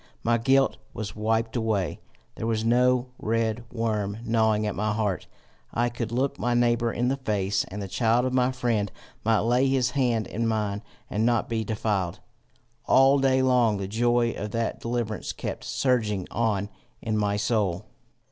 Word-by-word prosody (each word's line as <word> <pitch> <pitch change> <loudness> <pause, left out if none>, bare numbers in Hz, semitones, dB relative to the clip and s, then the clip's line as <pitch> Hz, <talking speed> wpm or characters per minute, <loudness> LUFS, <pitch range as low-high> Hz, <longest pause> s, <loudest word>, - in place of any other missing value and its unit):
My 115 0 +2
guilt 135 +3 +3 0.2
was 110 -3 -5
wiped 110 +2 0
away; 110 -6 -1 0.3
there 115 - -4
was 110 -1 0
no 125 +1 +3
red 115 +1 0
worm 110 -3 -1
gnawing 110 -2 +2
at 105 - -1
my 105 +1 -1
heart; 105 -3 -1 0.5
I 120 +1 +2
could 120 -1 -4
look 130 +3 -1
my 120 +2 +1
neighbour 120 -1 +2
in 120 +2 0
the 135 - 0
face, 100 -6 0
and 100 +1 -6
the - - -5
child 115 +5 +2
of 130 - -1
my 125 0 +3
friend 115 -6 -1 0.3
might 110 0 +3
lay 125 +4 +3
his 130 -2 +2
hand 120 -5 +1
in 115 +4 -2
mine 105 -2 -1 0.3
and 105 - -1
not 120 -1 +2
be 115 -1 -1
defiled! 105 -4 -1 0.7
All 135 +1 +5
day 130 -1 +3
long 125 -5 +3
the 100 -1 -4
joy 120 +2 +2
of 105 -1 -5
that 115 +2 -2
deliverance 115 -2 -3
kept - - -5
surging 110 -8 0
on 105 -3 0 0.3
in 110 -1 -1
my 105 -1 +1
soul. 105 -4 0
115 Hz, 170 wpm, -26 LUFS, 105-120 Hz, 0.7 s, All